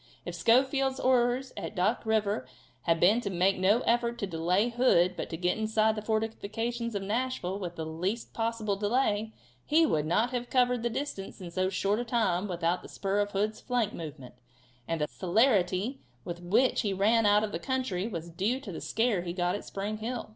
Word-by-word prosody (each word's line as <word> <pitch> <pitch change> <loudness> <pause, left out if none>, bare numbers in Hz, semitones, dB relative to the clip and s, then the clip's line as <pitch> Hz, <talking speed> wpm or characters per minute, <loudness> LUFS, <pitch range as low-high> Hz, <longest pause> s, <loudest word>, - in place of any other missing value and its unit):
If - - -5
Schofield's 265 +2 +2
orders 255 +1 +2
at - - -6
Duck 210 +5 0
river 205 -11 +1 0.4
had 165 -1 +2
been 205 +8 +4
to 200 - -3
make 185 +1 +2
no 205 +6 +4
effort 235 0 +1
to 200 - -2
delay 180 +5 +1
Hood 235 -7 +3
but - - -5
to 165 - -4
get 180 +4 0
inside 220 0 +2
the 215 - -4
fortifications 225 +2 -2
of 200 - -2
Nashville 210 -3 -2
with 175 -3 -5
the 160 - -4
least 180 +9 -3
possible 225 -3 -1
delay, 215 0 0 0.3
he 320 +2 +4
would 155 - 0
not 220 +9 +2
have 245 -1 -3
covered 250 -2 +2
the 235 - 0
distance 245 -7 -5
in 180 -3 -8
so 185 +1 0
short 195 +3 0
a - - -1
time 220 -6 0
without 175 -1 -1
the - - -12
spur 195 +1 -1
of 205 0 +1
Hood's 215 +2 -1
flank 245 -4 0
movement, 150 -6 -8 0.5
and 165 -2 -2
the 150 - +1
celerity 200 - +1 0.2
with 175 0 -6
which 210 +9 +2
he 205 -3 -1
ran 215 +3 +3
out 205 +1 +5
of 215 - -2
the - - -3
country 255 -8 -2
was 170 -6 -6
due 205 +10 0
to 220 -8 -8
the 165 - -6
scare 225 -4 +1
he 170 -1 -4
got 175 0 0
at 205 - -5
Spring 205 +2 -4
Hill. 235 +1 -4
210 Hz, 200 wpm, -29 LUFS, 185-235 Hz, 0.5 s, out